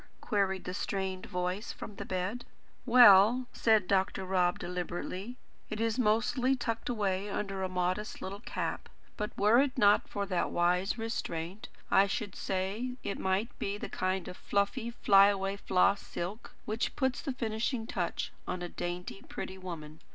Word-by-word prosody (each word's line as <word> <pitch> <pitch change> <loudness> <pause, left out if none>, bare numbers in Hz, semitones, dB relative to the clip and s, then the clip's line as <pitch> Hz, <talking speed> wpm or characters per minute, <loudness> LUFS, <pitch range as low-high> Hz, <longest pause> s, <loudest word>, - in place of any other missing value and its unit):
queried 195 -3 0
the 180 - -5
strained 190 -1 -3
voice 180 +4 -2
from 205 - -9
the - - -5
bed. 190 +6 -2 0.4
"Well," 240 0 +8
said 220 -5 +3
Dr. 190 0 +1
Rob 180 -1 +2
deliberately, 180 +5 -4 0.3
"it 215 - -4
is 225 +1 0
mostly 245 +4 +2
tucked 230 -2 -3
away 200 -3 -1
under 195 -1 -3
a 190 - -1
modest 185 +3 -1
little 195 +2 -6
cap; - - -4 0.3
but, 210 -1 -2
were 215 +5 +5
it 275 -2 -1
not 205 -3 +5
for 200 0 -2
that 185 -3 0
wise 180 +5 +1
restraint, 195 -4 -4 0.2
I 195 - +6
should 200 0 -3
say 195 +6 -2
it 200 - -3
might 190 +5 0
be 200 +1 -2
that - - -6
kind 185 -1 -1
of 180 - -7
fluffy, 205 +4 0
fly 200 -4 +6
away 195 -1 0
floss 200 0 +2
silk, 190 +6 -6
which 220 +2 -2
puts 260 -2 0
the 280 - -2
finishing 225 0 -2
touch 180 -6 -2 0.2
to - - -1
a 175 -1 -5
dainty, 175 +3 -5
pretty 190 0 -6
woman." 160 -4 -7
200 Hz, 160 wpm, -31 LUFS, 185-225 Hz, 0.4 s, Well